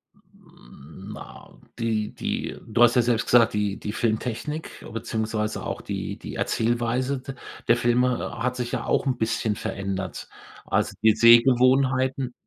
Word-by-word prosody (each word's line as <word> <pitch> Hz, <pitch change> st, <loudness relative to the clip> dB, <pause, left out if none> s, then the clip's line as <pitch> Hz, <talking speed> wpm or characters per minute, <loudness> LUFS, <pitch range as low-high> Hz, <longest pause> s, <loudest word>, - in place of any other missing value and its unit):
Hm, 80 Hz, -, -15 dB
na -, -, -12 dB, 0.2 s
die 110 Hz, -2 st, -1 dB
die -, -, -4 dB
du 120 Hz, +2 st, +3 dB
hast 120 Hz, +1 st, +5 dB
ja 125 Hz, -, +5 dB
selbst 120 Hz, -1 st, +1 dB
gesagt, 115 Hz, -2 st, +4 dB
die 105 Hz, -1 st, -1 dB
die 105 Hz, -, -5 dB
Filmtechnik 115 Hz, +7 st, -3 dB
beziehungsweise 110 Hz, -1 st, -3 dB
auch -, -, -4 dB
die -, -, -5 dB
die -, -, -8 dB
Erzählweise 120 Hz, +4 st, 0 dB
de 135 Hz, 0 st, -8 dB, 0.3 s
der 120 Hz, -, +5 dB
Filme 120 Hz, 0 st, 0 dB
hat 125 Hz, 0 st, 0 dB
sich 125 Hz, -1 st, -4 dB
ja 120 Hz, -3 st, -3 dB
auch -, -, +1 dB
'n 130 Hz, -2 st, 0 dB
bisschen 110 Hz, -1 st, -1 dB
verändert. 95 Hz, -1 st, -5 dB, 0.4 s
Also, -, -, 0 dB
die 110 Hz, -1 st, +5 dB
Sehgewohnheiten 130 Hz, +2 st, +4 dB
120 Hz, 145 wpm, -25 LUFS, 110-125 Hz, 0.4 s, hast